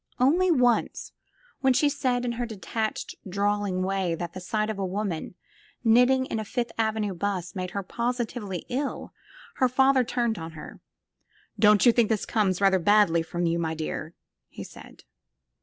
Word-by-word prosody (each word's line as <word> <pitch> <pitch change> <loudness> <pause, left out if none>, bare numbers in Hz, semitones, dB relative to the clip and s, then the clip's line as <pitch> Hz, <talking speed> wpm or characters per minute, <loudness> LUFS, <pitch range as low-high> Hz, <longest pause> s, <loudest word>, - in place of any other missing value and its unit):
Only 335 +9 +3
once, 250 -7 +1 0.5
when 265 -1 +3
she 295 - +3
said 255 -3 0
in 240 - -1
her 240 +1 -3
detached, 220 +1 -4 0.2
drawling 200 -1 0
way 190 -3 -1
that 170 0 -6
the - - -6
sight 215 +4 -1
of 205 - -7
a - - -1
woman 190 -3 -3 0.5
knitting 250 +3 +4
in 225 - -3
a - - -3
Fifth 235 +3 -3
Avenue 220 -2 -1
bus 185 -1 -3
made 185 -1 -4
her 200 +2 -4
positively 235 -4 -3
ill, 270 +3 -4 0.4
her 255 - +3
father 265 +1 +4
turned 235 -3 -1
on 165 0 -7
her. 155 - -10 0.8
"Don't 210 0 +5
you 240 - +8
think 230 -2 +2
this 220 -3 0
comes 195 -5 0
rather 195 -1 +4
badly 180 -2 +4
from 175 +2 -3
you, 170 0 0
my 160 -1 -2
dear?" 160 +1 -5 0.3
he - - -8
said. - - -14
210 Hz, 170 wpm, -26 LUFS, 185-245 Hz, 0.8 s, you